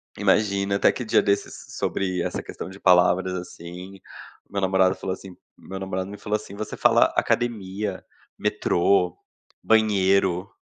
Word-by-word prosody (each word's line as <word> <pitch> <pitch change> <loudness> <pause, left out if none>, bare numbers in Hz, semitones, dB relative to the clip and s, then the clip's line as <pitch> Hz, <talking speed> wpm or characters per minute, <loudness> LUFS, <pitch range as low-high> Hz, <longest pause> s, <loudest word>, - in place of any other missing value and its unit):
Imagina 100 0 +1
até - - +4
que 125 - -6
dia 110 - +4
desses 100 0 -2
sobre 95 -2 -1
essa - - -3
questão - - -8
de 95 +1 -12
palavras, 90 0 +4
assim. 90 +2 -9 0.5
Meu 100 -1 -3
namorado 95 0 +3
falou 95 0 -4
assim 95 -1 -10 0.2
meu 95 0 -8
namorado 95 0 -4
me 105 - -8
falou 105 +1 -2
assim: 100 -1 -11
"Você 105 +1 -5
fala - - +5
academia, 105 -4 -1 0.3
metrô, 90 0 +1 0.5
banheiro, 100 -3 +2
95 Hz, 140 wpm, -24 LUFS, 95-100 Hz, 0.5 s, fala